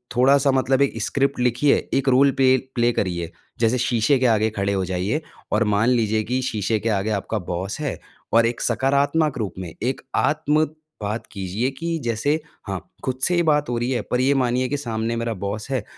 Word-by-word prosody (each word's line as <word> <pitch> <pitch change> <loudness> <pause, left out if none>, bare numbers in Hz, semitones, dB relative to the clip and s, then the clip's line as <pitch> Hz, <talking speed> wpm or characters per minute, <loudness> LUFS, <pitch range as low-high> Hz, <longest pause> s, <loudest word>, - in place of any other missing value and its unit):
थोड़ा-सा 135 +3 +4
मतलब 130 0 +2
एक 125 -5 +1
स्क्रिप्ट 140 +2 0
लिखिए, 125 +3 +3 0.2
एक 135 0 +2
रोल 135 +2 +5
पे 130 -1 +6 0.2
प्ले 120 -1 +3
करिए। 85 -6 -2 0.3
जैसे 115 +2 +2
शीशे 125 +2 +2
के 130 - +1
आगे 110 +1 +1
खड़े 100 -1 -1
हो 95 -1 0
जाइए 95 - -1 0.3
और 110 +2 +3
मान 110 +4 +3
लीजिए 110 -3 +2
कि 125 +3 -1
शीशे 110 0 0
के 115 - -1
आगे 105 0 0
आपका 110 - -3
बॉस 95 +7 -3
है 145 - -3 0.3
और 115 0 +5
एक 120 - -3
सकारात्मक 140 +5 +1
रूप 105 -5 -3
में, 90 -3 -6
एक 130 +2 -1
आत्म 155 +1 +2 0.3
बात 105 +2 -3
कीजिए 100 +6 -2
कि 165 0 -2
जैसे 120 +5 0 0.3
हाँ, 95 -1 -2 0.2
खुद 130 -1 -2
से 175 - +3
ही 175 - +3
बात 150 -4 +2
हो 120 - -1
रही 120 +1 -1
है 125 - 0
पर 125 - +2
ये 140 +2 +3
मानिए 125 0 +1
कि 145 - -1
सामने 115 -3 -2
मेरा 115 0 -2
बॉस 105 +5 -4
है 130 -6 0
120 Hz, 205 wpm, -22 LUFS, 110-135 Hz, 0.3 s, पे